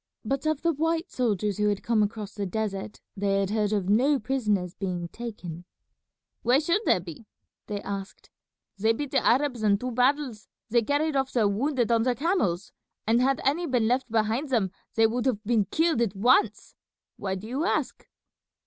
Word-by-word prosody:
But 275 +3 -1
of 310 0 0
the 335 -1 +2
white 325 +4 -1
soldiers 210 -5 0
who 210 0 +3
had 205 -1 -2
come 230 -2 +2
across 210 0 -2
the 200 -2 -3
desert, 205 +1 -4 0.2
they 195 0 +1
had 195 0 -1
heard 210 -1 +1
of 200 -4 0
no 255 +8 +4
prisoners 210 -8 -1
being 180 -4 -4
taken." 180 -8 -7 0.8
"Why 245 +3 +4
should 335 +7 +1
there - - +4
be?" 175 +5 -10 0.4
they 205 -1 -4
asked. 200 0 -7 0.5
"They 220 +3 +3
beat 285 +4 -4
the 275 - +2
Arabs 255 -1 +2
in 205 -2 +3
two 250 +4 -4
battles, 250 -2 0 0.2
they 235 0 +4
carried 290 +5 0
off 270 -1 0
their 225 -4 +3
wounded 240 +3 0
on 230 -1 +4
their 245 +1 +1
camels, 225 - 0 0.3
and 230 +3 +3
had 270 +1 +2
any 325 +6 +1
been 245 -5 +1
left 255 +2 0
behind 225 +6 0
them 215 -8 +1 0.2
they 225 - +5
would 240 +3 0
have 220 -5 0
been 220 -2 +2
killed 320 - +1
at 215 -4 0
once. 250 - +2 0.4
Why 190 -1 -2
do 190 +2 -8
you 265 +6 -2
ask?" - - -1
230 Hz, 185 wpm, -27 LUFS, 205-270 Hz, 0.8 s, they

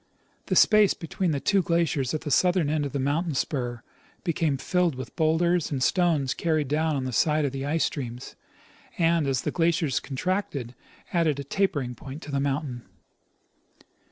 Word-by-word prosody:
The - - 0
space 210 -3 +5
between 175 +2 -2
the 145 -3 0
two 195 +6 +2
glaciers 165 -7 0
at 155 - -3
the 150 - -5
southern 175 0 +3
end 150 -2 0
of - - -9
the 140 - -2
mountain 145 +4 0
spur 120 -4 -2 0.4
became 165 -4 0
filled 180 +2 0
with 130 -2 -8
bowlders 165 +1 +2
and 135 -3 -1
stones 160 -6 +2
carried 155 -2 0
down 155 +1 +1
on 135 - -2
the 130 -1 -4
side 150 +4 +2
of 140 - -1
the 135 0 -4
ice 160 +2 +1
streams, 125 -3 -5 0.6
and, 165 -3 +2
as 130 -2 0
the - - -1
glaciers 165 -5 +1
contracted, 140 - -3 0.4
added 160 -5 +2
a - - -3
tapering 145 -5 -1
point 135 +5 -9
to 145 - -8
the 140 - 0
mountain. 140 -3 -2
150 Hz, 175 wpm, -26 LUFS, 135-170 Hz, 0.6 s, space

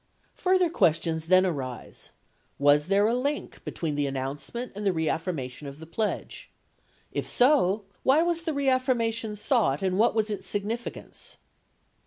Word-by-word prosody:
— - - -38
Further 370 -1 +2
questions 160 - +1
then 185 +1 +5
arise: 135 -8 -5 0.5
was 145 +2 +4
there 200 +2 +3
a 225 - +2
link 280 +4 -3
between 160 -3 -3
the 145 -1 0
announcement 140 - -4
and 205 +1 -6
the 195 - +3
reaffirmation 155 -5 -3
of 140 0 -8
the 160 - -10
pledge? 210 +6 -3 0.6
If - - -3
so, 245 -7 +3 0.2
why 290 +5 +4
was 340 -1 0
the 325 -1 -2
reaffirmation 245 -5 +1
sought 210 - +1
and 190 0 0
what 225 0 +4
was 215 -1 +1
its 205 - -5
significance 220 +4 -5
200 Hz, 150 wpm, -27 LUFS, 155-245 Hz, 0.6 s, then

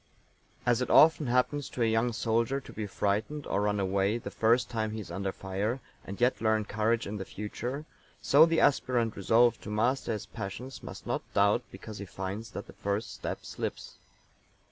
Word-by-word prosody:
As 120 0 +3
it 125 - -1
often 155 -2 +6
happens 125 +4 +1
to 120 - -1
a - - +4
young 115 +2 +2
soldier 115 +4 0
to - - -13
be 105 -1 -4
frightened 105 +9 -1
or 100 - 0
run 105 0 +1
away 100 +3 +1
the 120 - -7
first 115 +3 +3
time 110 -2 -2
he 110 - -4
is 100 -5 -8
under 95 +2 -2
fire, 100 +7 -2 0.2
and 100 - -8
yet 125 +1 +2
learn 110 -1 +2
courage 110 +2 0
in 105 +1 -4
the 95 - -4
future, 120 +9 -5 0.3
so 150 +4 +6
the 165 0 +2
aspirant 125 -5 +2
resolved 115 +5 +3
to - - -8
master 115 +4 +1
his 105 - -4
passions 125 +7 -7
must - - -9
not - - -1
doubt 100 +4 +4
because 110 -3 -9
he 100 - -5
finds 95 +4 -5
that - - -5
the - - -13
first 100 +2 -2
step - - -5
slips. - - -5
110 Hz, 190 wpm, -30 LUFS, 100-125 Hz, 0.3 s, often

